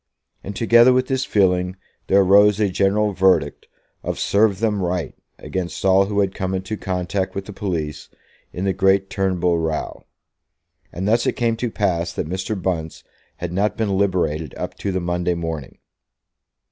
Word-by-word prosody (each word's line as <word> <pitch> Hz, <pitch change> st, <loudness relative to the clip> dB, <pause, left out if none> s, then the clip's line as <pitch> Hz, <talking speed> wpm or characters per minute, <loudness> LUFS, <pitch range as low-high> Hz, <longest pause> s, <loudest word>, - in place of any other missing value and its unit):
And 100 Hz, -, -6 dB
together 120 Hz, +3 st, +5 dB
with 130 Hz, 0 st, +2 dB
this 130 Hz, 0 st, -1 dB
feeling 90 Hz, -2 st, +1 dB, 0.3 s
there 100 Hz, +1 st, +5 dB
arose 100 Hz, +2 st, +5 dB
a 105 Hz, -2 st, +2 dB
general 100 Hz, +3 st, +1 dB
verdict 95 Hz, -6 st, +2 dB, 0.3 s
of -, -, -4 dB
"Serve 100 Hz, -1 st, +2 dB
them 105 Hz, -3 st, 0 dB
right" 90 Hz, -4 st, -2 dB, 0.2 s
against 95 Hz, 0 st, -5 dB
all 95 Hz, +1 st, +5 dB
who 100 Hz, 0 st, +1 dB
had 95 Hz, -1 st, 0 dB
come 95 Hz, 0 st, -2 dB
into 95 Hz, +3 st, -3 dB
contact 95 Hz, 0 st, -3 dB
with 100 Hz, 0 st, -4 dB
the 105 Hz, -, -9 dB
police 80 Hz, -7 st, -4 dB, 0.4 s
in 90 Hz, -, -4 dB
the 95 Hz, -, +1 dB
great 95 Hz, +1 st, +2 dB
Turnbull 90 Hz, -3 st, +1 dB
row; 80 Hz, -1 st, -3 dB, 0.9 s
and 95 Hz, +3 st, -4 dB
thus 115 Hz, +2 st, +2 dB
it -, -, +2 dB
came 115 Hz, -1 st, 0 dB
to 120 Hz, +1 st, -2 dB
pass 90 Hz, -6 st, -1 dB
that -, -, -3 dB
Mr. 95 Hz, +4 st, -3 dB
Bunce 85 Hz, -3 st, -3 dB, 0.3 s
had 90 Hz, 0 st, -5 dB
not 100 Hz, +3 st, 0 dB
been 105 Hz, -3 st, 0 dB
liberated 90 Hz, -7 st, 0 dB
up -, -, -4 dB
to 100 Hz, -, -2 dB
the 95 Hz, -, -1 dB
Monday 90 Hz, 0 st, -1 dB
morning. 80 Hz, -5 st, -5 dB
95 Hz, 170 wpm, -21 LUFS, 90-100 Hz, 0.9 s, together